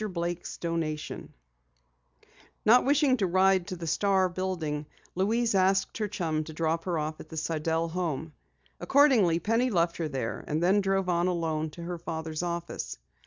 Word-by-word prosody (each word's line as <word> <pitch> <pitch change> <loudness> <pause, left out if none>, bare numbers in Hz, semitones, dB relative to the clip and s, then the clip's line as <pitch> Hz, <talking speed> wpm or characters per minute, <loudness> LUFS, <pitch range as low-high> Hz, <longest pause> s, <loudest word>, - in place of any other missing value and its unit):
BLAKE'S 175 -2 -4
DONATION_ 165 -3 -3 1.4
Not 240 +4 +7
wishing 280 -1 +3
to 195 -5 +1
ride 185 0 +3
to 185 - -4
the 170 -1 -7
Star 190 +3 +2
building, 170 -5 -3 0.3
Louise 225 +5 +1
asked 195 +2 +2
her 210 - 0
chum 165 -6 -2
to 160 - -8
drop 165 +1 -1
her 175 -3 -1
off 155 0 -3
at - - -11
the 160 - -8
Sidell 160 +1 -1
home. 160 -3 -3 0.5
Accordingly, 255 - +4
Penny 230 +8 +1
left 170 -5 +1
her 165 - -1
there, 130 -6 -4
and 155 +3 -1
then 195 +3 +4
drove 195 -1 0
on 175 0 +2
alone 160 -3 -1
to 170 +3 -10
her 175 0 -5
father's 160 -1 -4
office. 170 - -4
175 Hz, 165 wpm, -28 LUFS, 160-195 Hz, 1.4 s, Not